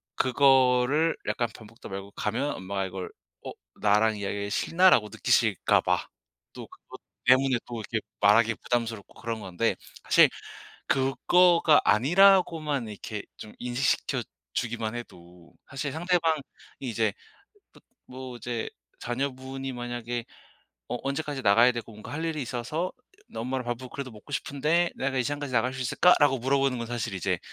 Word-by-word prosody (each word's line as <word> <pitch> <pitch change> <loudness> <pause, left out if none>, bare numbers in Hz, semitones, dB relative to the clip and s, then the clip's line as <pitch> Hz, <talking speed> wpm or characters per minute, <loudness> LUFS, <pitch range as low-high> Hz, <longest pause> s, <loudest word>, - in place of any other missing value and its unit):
그거를 130 +3 +3
약간 120 - 0
밥 110 - -12
먹다 115 +2 -13
말고 95 +1 -7
가면 120 +9 -2
엄마가 95 +1 -3
이걸 95 -1 -6 0.4
'어 - - -4 0.3
나랑 105 +1 +3
이야기하기가 100 0 -3
싫나?'라고 165 - +4
느끼실까 - - +2
봐. - - 0 0.5
또 - - -9
그것 - - -14 0.3
때문에 130 0 +4
또 120 -2 -6
이렇게 110 +1 -2 0.2
말하기 110 +3 +5
부담스럽고 115 -4 -3
그런 115 -1 -3
건데 95 +4 -1 0.3
사실 - - +6 0.6
그거가 160 +4 +4
아니라고만 155 - +4
이렇게 105 0 -6
좀 105 - -10
인식시켜 125 +1 0 0.3
주기만 115 -1 -2
해도 90 -7 -11 0.2
사실 140 +1 -4
상대방이 165 -1 +1 0.4
이제 115 -5 -1 0.9
뭐 130 -1 -8
이제 120 -1 -4 0.3
자녀분이 130 +1 -4
만약에 120 -1 -4 0.6
"어 - - -2
언제까지 145 0 -3
나가야 115 +5 +6
되고 120 -1 -6
뭔가 105 0 -10
할 160 +3 -3
일이 160 -2 -2
있어서 130 +8 -3 0.4
엄마랑 125 +2 -3
밥을 120 +1 -4
그래도 140 -2 -5
먹고 110 +6 -14
싶은데 150 +5 +1
내가 135 0 -2
이 130 - +2
시간까지 145 0 -4
나갈 125 +2 +1
수 135 - -7
있을까?"라고 140 0 +4
물어보는 135 +1 +1
건 115 - -4
사실 115 -3 -3
이제 90 -1 -1
125 Hz, 335 characters per minute, -27 LUFS, 110-140 Hz, 0.9 s, 사실